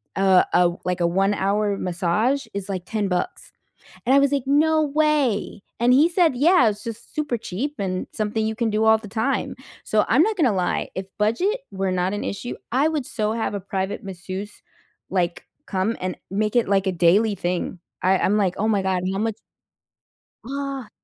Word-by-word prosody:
uh, 190 -1 +5
uh, - - +3 0.2
o 175 - -12
like, 180 0 -1
a 170 - +3
1 195 +3 +2
hour 200 +1 0
massage 195 +11 0
is, 200 0 -5
like, 185 -3 -3
10 210 0 -1
bucks, 180 -1 -3 0.6
and 260 - +4
I - - +7
was 280 0 +3
like, 280 -2 +1
"No 310 +3 +3
way!" 290 -9 +1 0.2
And 240 +1 +4
he 295 +5 +5
said, 340 -4 +3
"Yeah, 290 -2 +5
it's 210 -1 -4
just 230 0 -8
super 290 -6 -1
cheap 245 +9 -4
and 185 -2 -2
something 215 +1 -1
you 220 0 -2
can 235 -1 0
do 215 +1 +1
all 220 0 +6
the 220 - -11
time." 225 +6 -1 0.3
So 215 -1 +2
I'm 265 +7 +5
not 430 +3 +1
gonna 270 - +3
lie, 180 -2 -1
if 190 0 -4
budget 355 - +1
were 190 -1 -1
not 185 +1 0
an 205 - -3
issue, 240 +5 -4 0.2
I 275 +5 +3
would 300 -5 -2
so 215 -1 -1
have 225 -2 -2
a 200 - -3
private 190 +1 -3
masseuse, 190 +2 -7 0.5
like, 175 -2 -1 0.2
come 195 +3 -1
and 185 -1 -3
make 210 +3 -1
it, 235 - +3
like, 195 -1 +2
a - - +1
daily 185 +5 +3
thing, 180 +1 -2 0.2
I 185 +1 +3
I'm 200 +3 +2
like, 185 -3 +1
"Oh 215 +2 +1
my 205 -3 +2
God, 185 -1 0
how 195 - -2
much" 220 -1 -1 1.1
Ah, 275 -2 -4
210 Hz, 200 wpm, -23 LUFS, 190-260 Hz, 1.1 s, I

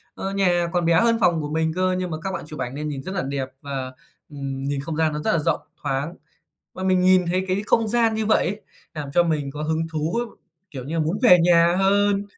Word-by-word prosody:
ờ, 195 - -4
nhà 175 -3 +2
còn 175 -1 +1
bé 170 - +3
hơn 230 -1 +3
phòng 170 -6 +2
của 150 - -4
mình 160 +1 0
cơ 185 0 +1
nhưng 185 -1 -3
mà 155 - -3
các 190 - -2
bạn - - -5
chụp 150 -2 -9
ảnh 125 +1 -4
nên 150 +1 -4
nhìn 135 -2 -5
rất 190 - -6
là 175 - 0
đẹp 135 -1 -3
và, 135 -2 -5 0.4
ừm, 135 -2 -5
nhìn 140 0 -2
không 155 +1 -5
gian 160 -1 +1
nó 150 - -3
rất - - 0
là 165 - +2
rộng, - - 0 0.2
thoáng. 140 +5 -2 0.6
Và 185 - -6
mình 185 -1 +3
nhìn 185 -1 +4
thấy 185 +2 0
cái 190 +2 0
không 225 0 +2
gian 230 -1 +2
như 220 -1 -1
vậy 220 - +3
ấy, 205 +4 -3 0.3
làm 150 -3 -5
cho 175 - +6
mình 155 -5 -1
có 150 +2 -6
hứng 160 +1 -1
thú, 160 +7 -1 0.5
kiểu 130 -3 -7
như 155 - -5
là, 165 - +1
muốn 160 +6 -1
về 180 -8 +8
nhà 170 0 +4
hơn. 200 +1 +2
170 Hz, 255 wpm, -23 LUFS, 150-185 Hz, 0.6 s, về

